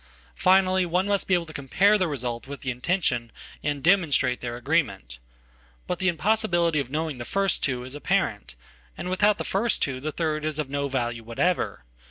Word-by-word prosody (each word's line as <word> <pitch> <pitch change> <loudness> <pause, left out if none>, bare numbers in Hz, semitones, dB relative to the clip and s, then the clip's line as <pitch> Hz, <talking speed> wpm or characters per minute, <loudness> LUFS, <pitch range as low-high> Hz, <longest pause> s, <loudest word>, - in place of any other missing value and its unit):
Finally, 185 - +4
one 180 +2 +1
must 200 -1 0
be 185 - +4
able 175 -1 0
to 155 - -11
compare 185 +10 +3
the 185 -4 +2
result 125 -5 -4
with 140 0 -8
the 130 - -2
intention 125 -3 -1 0.3
and 145 -2 -2
demonstrate 160 -8 +3
their 120 -1 -4
agreement. 125 - -1 0.7
But 180 - -3
the 190 - 0
impossibility 175 -3 +2
of 135 -3 -3
knowing 155 -2 -3
the - - -4
first 195 +8 +1
two 125 -3 -1
is 130 +1 -8
apparent. 145 - -1 0.4
And 180 +2 -4
without 205 +2 +3
the - - -3
first 220 +4 +1
two 130 -2 -2
the 155 +4 -3
third 155 -1 -2
is 155 -1 -2
of 150 -3 -3
no 140 0 -1
value 120 -3 -2
whatever. 120 - -1
155 Hz, 190 wpm, -25 LUFS, 130-185 Hz, 0.7 s, Finally